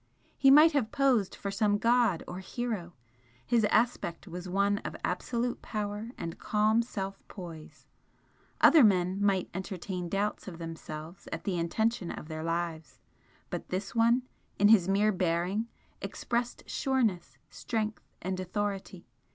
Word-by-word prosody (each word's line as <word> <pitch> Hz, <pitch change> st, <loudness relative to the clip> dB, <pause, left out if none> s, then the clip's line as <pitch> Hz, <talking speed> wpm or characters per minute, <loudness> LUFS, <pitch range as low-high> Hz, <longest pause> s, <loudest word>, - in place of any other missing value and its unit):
He 270 Hz, -, +5 dB
might 305 Hz, +4 st, +8 dB
have 260 Hz, -7 st, 0 dB
posed 265 Hz, -8 st, +2 dB
for 200 Hz, -, -4 dB
some 205 Hz, +1 st, +2 dB
god 230 Hz, -5 st, +3 dB
or 180 Hz, +1 st, -6 dB
hero, 195 Hz, -3 st, -4 dB, 0.5 s
his 235 Hz, -3 st, +3 dB
aspect 210 Hz, -5 st, +1 dB
was 180 Hz, +1 st, -6 dB
one 200 Hz, +2 st, +2 dB
of -, -, -6 dB
absolute 235 Hz, +6 st, -2 dB
power 210 Hz, +1 st, -4 dB
and 165 Hz, 0 st, -6 dB
calm 215 Hz, +2 st, +2 dB
self 195 Hz, -4 st, -5 dB
poise, 170 Hz, -5 st, -10 dB, 0.8 s
other 315 Hz, -5 st, +8 dB
men 190 Hz, -1 st, +3 dB
might 195 Hz, -3 st, +2 dB
entertain 185 Hz, -1 st, -4 dB
doubts 200 Hz, +2 st, -1 dB
of 175 Hz, -3 st, -7 dB
themselves 165 Hz, 0 st, -8 dB
at 165 Hz, -, -4 dB
the 195 Hz, -, -1 dB
intention 180 Hz, +3 st, 0 dB
of 155 Hz, -, -7 dB
their 155 Hz, 0 st, -4 dB
lives, 165 Hz, -1 st, -3 dB, 0.5 s
but -, -, -5 dB
this 190 Hz, +2 st, -3 dB
one 235 Hz, +2 st, +4 dB, 0.3 s
in 205 Hz, +1 st, +5 dB
his 195 Hz, -5 st, +6 dB
mere 205 Hz, +2 st, +3 dB
bearing 180 Hz, +4 st, 0 dB, 0.3 s
expressed 240 Hz, 0 st, -3 dB
sureness, 230 Hz, -10 st, 0 dB
strength 220 Hz, -2 st, -3 dB, 0.2 s
and 185 Hz, +1 st, -2 dB
authority. 195 Hz, -1 st, -3 dB
200 Hz, 140 wpm, -30 LUFS, 175-225 Hz, 0.8 s, might